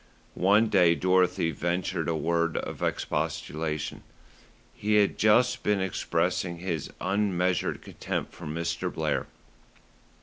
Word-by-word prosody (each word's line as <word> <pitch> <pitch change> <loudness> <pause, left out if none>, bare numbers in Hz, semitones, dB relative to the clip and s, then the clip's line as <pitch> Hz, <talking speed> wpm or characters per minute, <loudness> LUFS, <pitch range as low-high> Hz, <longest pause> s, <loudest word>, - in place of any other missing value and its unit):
One 105 +5 +4
day 85 -5 +4
Dorothy 90 -2 +2
ventured 85 +1 -2
a 80 - 0
word 85 +1 0
of - - -5
expostulation. 80 0 -2 0.7
He 105 +1 0
had 105 -1 +4
just 125 +4 +3
been 105 -1 +1
expressing 90 -2 -1
his 85 -5 -4
unmeasured 95 -3 0
contempt - - -4
for 85 - -9
Mr. 85 +2 -2
Blair. - - -1
90 Hz, 110 wpm, -27 LUFS, 80-100 Hz, 0.7 s, One